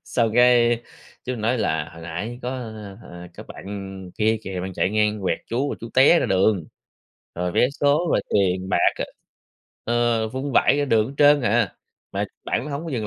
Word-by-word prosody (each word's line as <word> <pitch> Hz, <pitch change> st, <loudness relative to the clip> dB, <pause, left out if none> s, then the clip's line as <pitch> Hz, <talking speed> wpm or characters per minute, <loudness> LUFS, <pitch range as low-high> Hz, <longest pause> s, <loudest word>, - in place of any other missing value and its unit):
Xong 115 Hz, -3 st, 0 dB
cái, 120 Hz, -1 st, +4 dB, 0.4 s
chú 125 Hz, -, -3 dB
nói 115 Hz, +2 st, -1 dB
là 80 Hz, -6 st, -1 dB
"Hồi 80 Hz, -, -12 dB
nãy 100 Hz, +9 st, -5 dB
có, 125 Hz, -, -3 dB
ơ, 110 Hz, -5 st, -7 dB
ờ, 90 Hz, 0 st, -11 dB
có -, -, -8 dB
bạn 95 Hz, -2 st, -8 dB
kia 110 Hz, +1 st, +2 dB
kìa 95 Hz, -1 st, -5 dB
bạn 95 Hz, +1 st, -5 dB
chạy 95 Hz, -, 0 dB
ngang 105 Hz, -1 st, +1 dB
quẹt 95 Hz, -, 0 dB
chú, 130 Hz, +5 st, -1 dB
rồi -, -, -4 dB
chú 115 Hz, -, -7 dB
té 140 Hz, +6 st, +6 dB
ra -, -, 0 dB
đường, 95 Hz, -2 st, +2 dB, 0.7 s
rồi 90 Hz, 0 st, -2 dB
vé 125 Hz, -, +3 dB
số, 145 Hz, +4 st, +1 dB
rồi -, -, +3 dB
tiền 95 Hz, -2 st, +1 dB
bạc, 90 Hz, -, +3 dB
ờ, -, -, -1 dB, 1.1 s
ơ, 110 Hz, 0 st, -1 dB
vung 130 Hz, +3 st, -4 dB
vãi 145 Hz, -, +4 dB
ra 145 Hz, -, +1 dB
đường 110 Hz, -5 st, +2 dB
hết 140 Hz, -, -9 dB
trên 145 Hz, 0 st, +6 dB
à, 115 Hz, -3 st, +1 dB, 0.4 s
mà -, -, -1 dB, 0.2 s
bạn -, -, -1 dB
đó -, -, -6 dB
hổng 145 Hz, +4 st, -4 dB
có 165 Hz, -, -5 dB
dừng 110 Hz, -5 st, -2 dB
110 Hz, 205 wpm, -23 LUFS, 95-125 Hz, 1.1 s, té